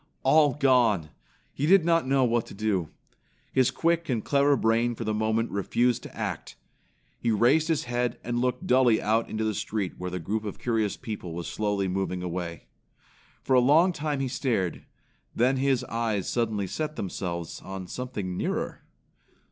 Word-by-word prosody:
All 145 0 +5
gone! 120 - +3 0.4
He 145 - -1
did 190 -1 +6
not 165 -4 +2
know 135 0 +3
what 120 -2 +1
to - - -10
do. 100 -6 -1 0.6
His 130 -1 +3
quick 170 +5 0
and 115 -4 -1
clever 140 0 +3
brain 115 +1 +2
for 115 - -5
the 110 -1 -1
moment 110 +2 0
refused 120 +5 +1
to - - -11
act. - - -4 0.6
He 120 - -1
raised 125 +9 +3
his 160 -3 +1
head 120 -1 -1
and 120 0 -2
looked 125 0 -1
dully 125 -3 +4
out 110 +2 +1
into 110 0 -2
the 110 -1 0
street 100 -2 -3
where 90 0 -3
the 90 - -4
group 105 +6 -3
of 105 - -5
curious 110 -4 -1
people 100 -6 -6
was 85 -1 -5
slowly 100 +4 -1
moving 90 -1 -2
away. 85 -3 -5 0.8
For - - 0
a 130 - +7
long 155 +9 +5
time 150 -3 -2
he 135 - 0
stared, 115 - -1 0.5
then 130 +3 +2
his 130 -1 +1
eyes 115 -5 -2
suddenly 110 -4 0
set 155 +10 -4
themselves 85 -3 -4
on 95 -1 -7
something 105 -4 -5
nearer. - - -3
115 Hz, 170 wpm, -27 LUFS, 100-130 Hz, 0.8 s, a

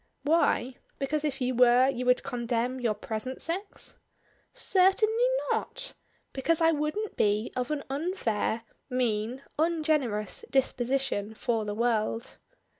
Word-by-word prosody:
"Why? 285 -5 +2 0.2
Because, 290 +2 -1
if 290 -3 -2
you 255 0 +1
were, 250 +1 +6
you 250 -2 -2
would 250 0 +4
condemn 245 -1 -2
your 230 -4 0
present 220 +5 -5
sex?" 385 +5 -4 0.5
"Certainly 430 +5 +3 0.2
not! - - -3 0.4
Because 310 +5 +1
I 325 0 +5
wouldn't 305 +8 -2
be 210 +2 +1
of 250 0 -2
an 300 -2 -2
unfair, 270 - -1 0.3
mean, 245 0 -1 0.2
ungenerous 305 - +1
disposition 255 -5 0
for 225 -1 -1
the 205 0 -3
world." 225 0 -1
255 Hz, 120 wpm, -28 LUFS, 230-305 Hz, 0.5 s, were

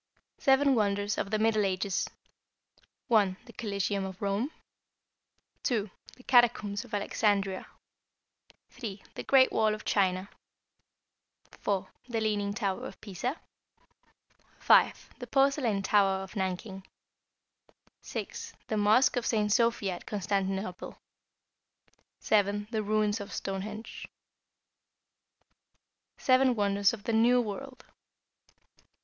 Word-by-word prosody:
=Seven 275 +1 +4
Wonders 205 -2 +1
of 195 - -2
the 215 - +1
Middle 215 -1 +2
Ages.= 190 0 -1 1.0
(1) 200 -5 +3
The 235 - -14
Coliseum 200 -3 -2
at 190 -1 -9
Rome, 200 +6 -1 1.1
(2) 215 -6 -1 0.2
the 255 - -18
Catacombs 235 -5 +3
of - - -6
Alexandria, 200 -2 0 1.0
(3) 215 -6 -7
the - - -6
Great 265 -1 +5
Wall 215 -1 +2
of 215 - -12
China, 185 -1 +1 1.2
(4) 195 -2 -2 0.2
the 230 -2 -1
Leaning 205 -2 0
Tower 200 -3 -2
of - - -12
Pisa, 235 - -4 1.2
(5) - - +4
the 245 - -7
Porcelain 270 -6 +2
Tower 195 -1 +3
of 190 +3 -11
Nanking, 190 0 -3 1.2
(6) - - -6 0.2
the 220 - 0
Mosque 215 +6 +4
of 240 - -1
St. 210 -2 +1
Sophia 230 -5 +2
at - - -16
Constantinople, 195 -2 -3 1.2
(7) 205 0 +1
the 220 -2 0
Ruins 215 0 +1
of 200 - -8
Stonehenge. 210 +3 -5 2.1
=Seven 255 -1 +3
Wonders 200 -1 +2
of 220 -3 -8
the 230 - -2
New 240 +3 +5
World. 255 +4 -5
210 Hz, 110 wpm, -29 LUFS, 195-230 Hz, 2.1 s, Great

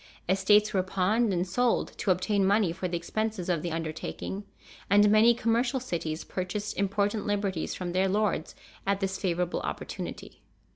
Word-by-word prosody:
Estates 205 +3 +4
were 190 - +3
pawned 195 +5 +1
and 180 0 0
sold 245 +6 +1
to - - -1
obtain 190 +2 +2
money 200 -2 +3
for 185 +2 -3
the 175 -1 -2
expenses 215 +1 -3
of 170 -4 +1
the 170 - -3
undertaking, 165 +5 -4 0.4
and 205 +1 +6
many 225 +2 +6
commercial 240 +3 +1
cities 165 -9 -3
purchased 195 +3 -4
important 200 +2 0
liberties 200 -4 -1
from 180 -1 -4
their 190 +2 +2
lords 205 -5 0 0.3
at 200 0 +2
this 190 -1 -2
favorable 180 -2 -1
opportunity. - - -6
195 Hz, 155 wpm, -28 LUFS, 180-210 Hz, 0.4 s, and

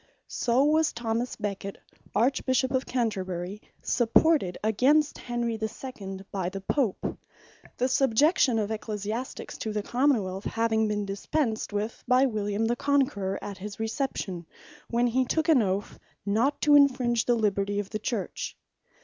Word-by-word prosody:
So 245 +3 +1
was 310 +2 +3
Thomas 235 +1 -2
Beckett 200 -2 -4 0.4
Archbishop 260 +3 +2
of 260 0 0
Canterbury, 195 -5 -2 0.2
supported 240 - +3
against 275 +8 +3
Henry 240 -2 -2
the 220 0 -1
Second, 195 -6 -8
by 185 -3 -2
the 195 +1 -6
Pope; 230 0 -1 0.6
the 250 - +2
subjection 265 +1 +3
of 215 -1 -1
Ecclesiastiques 215 +3 -4
to 220 - -3
the 210 -1 -2
Common 255 -2 +2
wealth, 190 +2 -6
having 220 -1 +1
been 210 -1 -1
dispensed 220 +4 -2
with 210 +2 -3
by 255 +2 +5
William 210 -2 -1
the 235 +2 +1
Conqueror 260 -9 +1
at 200 -2 -6
his 205 +2 -7
reception, 220 - -3 0.4
when 240 +1 +2
he 250 +2 +2
took 315 +5 0
an 305 -7 +6
Oath, 195 0 -2 0.3
not 230 +8 +1
to 295 - +4
infringe 255 -5 +4
the 240 - +3
liberty 205 -2 0
of 200 -1 -5
the 215 - -2
Church. 215 -2 -3
225 Hz, 150 wpm, -27 LUFS, 205-260 Hz, 0.6 s, an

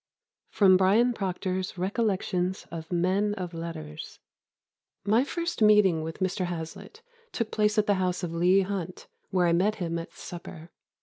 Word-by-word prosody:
[Sidenote: 190 -3 +5
Bryan 220 +6 +4
Procter's 185 -2 -3
Recollections 190 -2 -1
of 165 0 -7
Men 190 +4 +1
of 180 -3 -5
Letters.] 160 -2 -7 0.9
"My 220 +5 +4
first 340 -1 -4
meeting 210 -6 +5
with 160 +1 -5
Mr. 185 0 0
Hazlitt 175 - -7 0.3
took 230 -2 -3
place 210 0 +1
at 210 - +4
the 205 - +3
house 180 0 -1
of 170 -1 -3
Leigh 180 +3 +4
Hunt, 185 -2 -4 0.2
where 185 -2 +2
I 170 - +3
met 200 +5 +2
him 170 -4 -3
at 165 - -8
supper. 170 -1 -10
185 Hz, 150 wpm, -27 LUFS, 170-210 Hz, 0.9 s, Sidenote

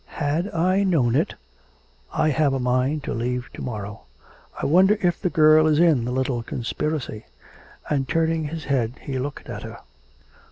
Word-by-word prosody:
Had 160 +6 -1
I 185 +4 +2
known 150 -12 +2
it.... 135 - +1 0.8
I 155 - +1
have 145 -2 +2
a - - -1
mind 130 +4 0
to - - -3
leave 125 +1 -3
to - - -8
morrow. 105 -4 -6 0.5
I - - -2
wonder 190 +7 +5
if 175 -2 +1
the 180 - +1
girl 155 -1 +5
is 155 -1 +3
in 160 -9 +4
the 125 - -2
little 130 -1 -1
conspiracy.' 120 0 -4 0.6
And 135 -3 -1
turning 165 -1 +1
his 160 +1 -5
head 125 -5 0
he 135 -3 -4
looked 140 +2 -5
at - - -6
her. - - -8
145 Hz, 170 wpm, -23 LUFS, 125-160 Hz, 0.8 s, wonder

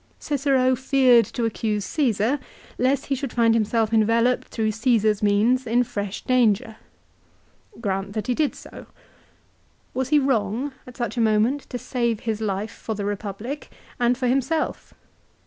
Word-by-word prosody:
Cicero 270 -3 +1
feared 255 -3 +4
to 235 +3 -3
accuse 215 -2 -2
Caesar, 255 -2 +1 0.4
lest 265 +2 +1
he 280 - -1
should 270 -1 -3
find 230 -1 +3
himself 225 0 +1
enveloped 230 +3 +2
through 220 -1 -1
Caesar's 220 -2 +2
means 220 +5 +2
in 240 +2 +3
fresh 205 -4 -5
danger. 230 -3 +2 1.0
Grant 195 -2 -2
that 215 -1 -3
he 250 - 0
did 300 +3 0
so. - - -12 1.1
Was 260 0 -2
he 300 - +5
wrong 260 0 0
at 250 - -12
such 240 -2 -3
a - - +2
moment 225 +6 +1
to 250 - -4
save 235 -2 -2
his 220 -2 -3
life 205 0 -2
for 220 - -5
the 200 -1 -4
Republic; 205 +7 -5 0.3
and 240 0 +2
for 255 - -2
himself? 270 +5 -1
235 Hz, 150 wpm, -23 LUFS, 215-255 Hz, 1.1 s, he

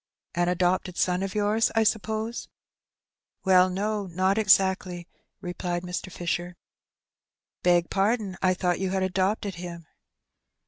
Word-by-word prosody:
*' - - -67
An 175 0 +1
adopted 180 0 0
son 180 0 +1
of 195 0 -4
yours, 210 +2 +2
I 225 - +4
suppose? 220 +2 -1 0.5
" - - -48
''Well, 185 -1 +5
no, 205 +1 -2
not 185 +4 +1
exactly," 190 -3 +2 0.3
replied 175 -1 -3
Mr. 180 +1 -5
Fisher. 175 0 -3 1.1
"Beg 175 -1 +3
pardon, 200 0 0
I 185 -1 +3
thought 180 -1 0
you 190 -1 -1
had 190 0 0
adopted 190 +2 0
him." 170 -2 -7
185 Hz, 135 wpm, -26 LUFS, 180-205 Hz, 1.1 s, Well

